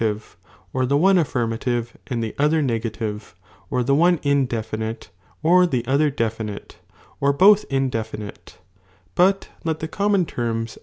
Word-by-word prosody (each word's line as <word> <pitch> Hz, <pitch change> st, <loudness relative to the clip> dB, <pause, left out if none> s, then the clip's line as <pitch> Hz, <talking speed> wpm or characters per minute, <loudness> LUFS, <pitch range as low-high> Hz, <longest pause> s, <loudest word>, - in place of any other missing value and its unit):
tire, 110 Hz, -2 st, +1 dB, 0.6 s
or 130 Hz, -, 0 dB
the 140 Hz, +2 st, +2 dB
one 190 Hz, +4 st, +5 dB
affirmative 120 Hz, -4 st, -1 dB
and 120 Hz, -4 st, -2 dB
tlie 110 Hz, -, -4 dB
other 150 Hz, +2 st, +3 dB
negative, 110 Hz, -5 st, -3 dB, 0.3 s
or 125 Hz, -3 st, 0 dB
the 140 Hz, +3 st, +1 dB
one 170 Hz, +4 st, +4 dB
tiwlefinite, 115 Hz, -6 st, -2 dB, 0.3 s
or 180 Hz, +3 st, +5 dB
the 125 Hz, -7 st, -1 dB
other 140 Hz, +4 st, +2 dB
delinile, 110 Hz, -5 st, -4 dB, 0.5 s
or 140 Hz, 0 st, +3 dB
both 195 Hz, +8 st, +5 dB
indefinite; 115 Hz, -6 st, -3 dB, 0.6 s
but 195 Hz, +2 st, +2 dB
let 160 Hz, -1 st, -2 dB
the 160 Hz, -, -3 dB
"■mmal," 200 Hz, +5 st, 0 dB
"white," 170 Hz, -, -3 dB
"atone." 115 Hz, -1 st, -2 dB
130 Hz, 145 wpm, -22 LUFS, 115-155 Hz, 0.6 s, one